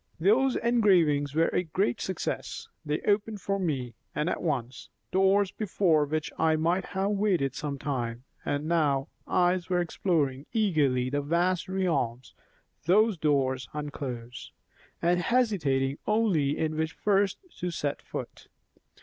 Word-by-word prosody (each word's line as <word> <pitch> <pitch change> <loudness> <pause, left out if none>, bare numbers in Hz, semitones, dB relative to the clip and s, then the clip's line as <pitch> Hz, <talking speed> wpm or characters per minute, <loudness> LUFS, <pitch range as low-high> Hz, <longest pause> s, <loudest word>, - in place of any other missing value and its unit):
Those 240 +10 +3
engravings 175 - +3
were 165 +1 +3
a - - +1
great 165 -6 -1
success; - - -4 0.2
they 150 0 -2
opened 210 +1 0
for 195 +1 -1
me, 135 -9 -2 0.2
and 150 +4 0
at - - -3
once, 130 -6 -3 0.2
doors 195 +1 +3
before 180 -7 +2
which 155 +1 -2
I 160 0 +3
might 170 +4 +1
have 195 +1 -1
waited 195 - +1
some 150 -1 -4
time; 125 -4 -3 0.2
and 145 +1 -2
now, 150 -4 +1 0.2
eyes 180 0 +2
are 180 -1 +2
exploring 155 -6 0
eagerly 145 - +2
the 145 0 0
vast 175 +5 0
realms 140 -11 -1 0.5
those 210 +5 +4
doors 135 -6 0
unclose, 130 -5 -6 0.5
and 175 +1 +3
hesitating 165 - +1
only 190 -10 +2
in 155 -1 -1
which 160 0 -1
first 200 -1 +1 0.2
to 180 - -2
set 145 -4 -3
foot. - - -7
160 Hz, 135 wpm, -28 LUFS, 140-190 Hz, 0.5 s, those